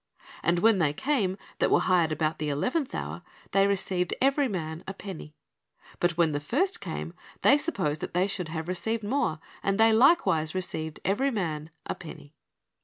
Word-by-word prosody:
And 170 Hz, +1 st, +2 dB
when 220 Hz, +2 st, +4 dB
they 150 Hz, -4 st, +2 dB
came 210 Hz, -, 0 dB, 0.2 s
that -, -, +3 dB
were -, -, +5 dB
hired 175 Hz, -4 st, +3 dB
about 155 Hz, 0 st, -1 dB
the 150 Hz, -1 st, -1 dB
eleventh 255 Hz, -, -1 dB
hour, -, -, -4 dB, 0.3 s
they 195 Hz, 0 st, +4 dB
received 185 Hz, -3 st, 0 dB
ev^ery 275 Hz, 0 st, +3 dB
man 160 Hz, -4 st, -4 dB
a 195 Hz, -, -5 dB
penny. 180 Hz, -7 st, -8 dB, 0.6 s
But 175 Hz, -1 st, +1 dB
when 170 Hz, -2 st, +3 dB
the 145 Hz, -, -1 dB
first 300 Hz, -, 0 dB
came, -, -, -5 dB, 0.3 s
they 285 Hz, -, +6 dB
supposed 180 Hz, -, -2 dB
that -, -, -5 dB
they 180 Hz, +1 st, +3 dB
should 190 Hz, -3 st, -3 dB
have 160 Hz, 0 st, -4 dB
received 210 Hz, +5 st, -1 dB
more; 210 Hz, -, 0 dB, 0.2 s
and 195 Hz, +1 st, 0 dB
they 225 Hz, 0 st, +6 dB
likewise 200 Hz, -, +4 dB
received 160 Hz, -4 st, -4 dB
every 205 Hz, +9 st, +2 dB
man 160 Hz, -, -3 dB, 0.2 s
a -, -, -2 dB
penny." 155 Hz, -2 st, -11 dB
185 Hz, 180 wpm, -28 LUFS, 160-225 Hz, 0.6 s, they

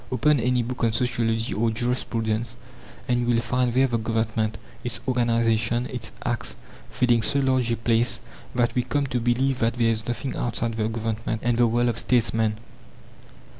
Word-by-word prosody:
Open 145 Hz, +3 st, +3 dB
any 125 Hz, +1 st, +1 dB
book 125 Hz, +2 st, -4 dB
on 115 Hz, -, +3 dB
sociology 115 Hz, -1 st, 0 dB
or 115 Hz, +2 st, +1 dB
jurisprudence, 115 Hz, -1 st, -1 dB, 0.5 s
and 120 Hz, -1 st, +2 dB
you 120 Hz, -, 0 dB
will -, -, +3 dB
find 120 Hz, +1 st, 0 dB
there 130 Hz, +1 st, +5 dB
the 120 Hz, -3 st, 0 dB
Government, 110 Hz, -1 st, -1 dB, 0.3 s
its 120 Hz, -2 st, -4 dB
organization, 115 Hz, -1 st, +1 dB
its 125 Hz, -3 st, -3 dB
acts, 120 Hz, -1 st, -2 dB, 0.3 s
filling 120 Hz, -2 st, +2 dB
so 140 Hz, +6 st, +2 dB
large 130 Hz, -3 st, +2 dB
a 115 Hz, -, 0 dB
place 115 Hz, +1 st, +1 dB, 0.4 s
that 120 Hz, -1 st, +2 dB
we 125 Hz, -, +2 dB
come 140 Hz, +3 st, -1 dB
to 125 Hz, -2 st, -1 dB
believe 125 Hz, +3 st, +1 dB
that 115 Hz, 0 st, +1 dB
there 115 Hz, -2 st, +2 dB
is 110 Hz, 0 st, -3 dB
nothing 120 Hz, +2 st, -3 dB
outside 115 Hz, -1 st, -1 dB
the 110 Hz, -1 st, -1 dB
Government 115 Hz, 0 st, -2 dB
and 120 Hz, -1 st, +2 dB
the 120 Hz, 0 st, +5 dB
world 120 Hz, +1 st, +2 dB
of 115 Hz, 0 st, -1 dB
statesmen. 115 Hz, -3 st, +1 dB
120 Hz, 175 wpm, -25 LUFS, 115-125 Hz, 0.5 s, there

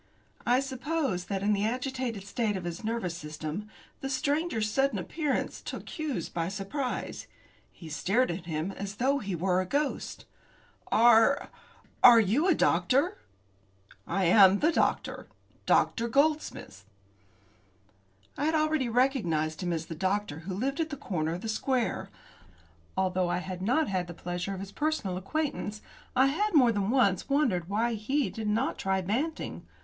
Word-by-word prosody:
I 250 Hz, +2 st, +4 dB
suppose 265 Hz, -, -2 dB
that 195 Hz, -1 st, -3 dB
in 210 Hz, +1 st, +3 dB
the 200 Hz, 0 st, 0 dB
agitated 250 Hz, -2 st, -2 dB
state 210 Hz, 0 st, -1 dB
of 185 Hz, -, -6 dB
his 175 Hz, +2 st, -5 dB
nervous 220 Hz, -6 st, -2 dB
system, 155 Hz, +6 st, -6 dB, 0.3 s
the 270 Hz, -, -4 dB
stranger's 280 Hz, -3 st, 0 dB
sudden 270 Hz, -2 st, +1 dB
appearance 275 Hz, -, -2 dB
took -, -, -7 dB
Hughes 295 Hz, -, -3 dB
by 165 Hz, -1 st, -3 dB
surprise. 210 Hz, +8 st, -4 dB, 0.4 s
He 165 Hz, -, -12 dB
stared 195 Hz, +11 st, +1 dB
at 170 Hz, 0 st, -6 dB
him 160 Hz, +3 st, -2 dB
as 195 Hz, +1 st, -6 dB
though 270 Hz, +5 st, +1 dB
he 200 Hz, -6 st, -3 dB
were 180 Hz, +2 st, +1 dB
a -, -, -3 dB
ghost. 285 Hz, +5 st, -2 dB, 0.7 s
"Are 235 Hz, +4 st, +5 dB, 0.5 s
are 240 Hz, -2 st, +10 dB
you 230 Hz, -, +2 dB
the 345 Hz, -, +5 dB
doctor?" 270 Hz, -, +2 dB, 0.9 s
"I 195 Hz, -1 st, 0 dB
am 190 Hz, +2 st, +7 dB
the 315 Hz, +9 st, +3 dB
doctor -, -, 0 dB, 0.4 s
Dr. 235 Hz, 0 st, +3 dB
Goldsmith." 285 Hz, -, 0 dB, 1.5 s
I 285 Hz, -, -2 dB
had 320 Hz, +1 st, +2 dB
already 310 Hz, -5 st, +1 dB
recognised 180 Hz, -, +1 dB
him 175 Hz, -1 st, -1 dB
as 165 Hz, -1 st, -2 dB
the 165 Hz, -, -6 dB
doctor 190 Hz, -2 st, -1 dB
who 180 Hz, +3 st, -5 dB
lived 270 Hz, -, -2 dB
at 320 Hz, -1 st, 0 dB
the 285 Hz, -, -5 dB
corner 165 Hz, -8 st, -2 dB
of 180 Hz, -, -7 dB
the -, -, -5 dB
square. 245 Hz, +2 st, -1 dB, 0.9 s
Although 185 Hz, -1 st, +1 dB
I -, -, 0 dB
had 180 Hz, 0 st, -5 dB
not 195 Hz, -, +1 dB
the 175 Hz, -, -8 dB
pleasure 175 Hz, +3 st, -4 dB
of 190 Hz, -, -6 dB
his 195 Hz, 0 st, -7 dB
personal 295 Hz, -10 st, -1 dB
acquaintance, 215 Hz, -, -3 dB, 0.4 s
I 260 Hz, -, +5 dB
had 365 Hz, +8 st, 0 dB
more 250 Hz, -5 st, +6 dB
than 205 Hz, -2 st, -1 dB
once 230 Hz, -7 st, +2 dB
wondered 230 Hz, -, +1 dB
why 230 Hz, +4 st, +1 dB
he 265 Hz, +7 st, -1 dB
did 220 Hz, -2 st, -5 dB
not 225 Hz, +6 st, 0 dB
try 190 Hz, 0 st, 0 dB
Banting. 255 Hz, -, -2 dB
215 Hz, 155 wpm, -29 LUFS, 185-270 Hz, 1.5 s, are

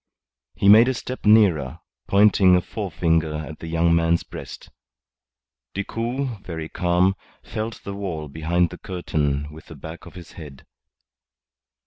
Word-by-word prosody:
He 100 Hz, -, 0 dB
made 110 Hz, +4 st, +8 dB
a 130 Hz, -, 0 dB
step 130 Hz, 0 st, -7 dB
nearer, 95 Hz, -, +4 dB, 0.3 s
pointing 100 Hz, -2 st, +5 dB
a 90 Hz, -, +3 dB
forefinger 80 Hz, -6 st, -1 dB
at 75 Hz, 0 st, -7 dB
the 80 Hz, -, -8 dB
young 85 Hz, +1 st, +2 dB
man's 85 Hz, 0 st, +2 dB
breast. -, -, -10 dB, 1.0 s
Decoud, 115 Hz, +3 st, -3 dB
very 80 Hz, -2 st, -6 dB
calm, 90 Hz, +2 st, +2 dB, 0.3 s
felt 110 Hz, +1 st, -5 dB
the 100 Hz, -, -6 dB
wall 90 Hz, -6 st, -5 dB
behind 80 Hz, +4 st, 0 dB
the -, -, -10 dB
curtain 75 Hz, -5 st, -2 dB
with 80 Hz, -, -13 dB
the 80 Hz, -, -11 dB
back 80 Hz, +5 st, -10 dB
of 85 Hz, -, -14 dB
his 90 Hz, -2 st, -11 dB
head. 75 Hz, -5 st, -12 dB
85 Hz, 140 wpm, -23 LUFS, 80-100 Hz, 1.0 s, made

